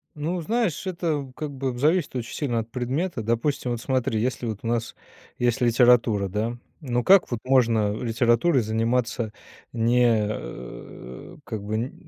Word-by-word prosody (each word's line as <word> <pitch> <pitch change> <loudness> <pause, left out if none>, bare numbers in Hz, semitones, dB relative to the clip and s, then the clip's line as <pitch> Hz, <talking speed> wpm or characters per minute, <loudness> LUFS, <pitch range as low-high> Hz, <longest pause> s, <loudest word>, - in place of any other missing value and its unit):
Ну, 165 +4 -2
знаешь, 210 -2 -1
это, 155 -7 -2
как 150 -1 -5
бы, 130 -2 -3
зависит 155 +2 +1
очень 120 -1 -4
сильно 120 -6 -1
от 115 +1 -6
предмета. 130 +4 -2
Допустим, 120 +3 -1
вот 120 - -2
смотри, 125 -4 0
если 125 +2 -1
вот 110 -2 -4
у - - -3
нас 115 -1 -1 0.4
есть 120 0 +1
литература, 120 -4 +4
да? 110 +5 -2 0.2
Ну, 125 -3 -1
как 195 -1 +6
вот 120 - -1
можно 115 -5 +3
литературой 120 +5 +2
заниматься 115 +1 -1 0.4
не, 120 0 +3
э, 65 - -8
как 110 -3 -5
бы 105 +1 -3
н 120 +4 -2
120 Hz, 155 wpm, -25 LUFS, 115-140 Hz, 0.4 s, как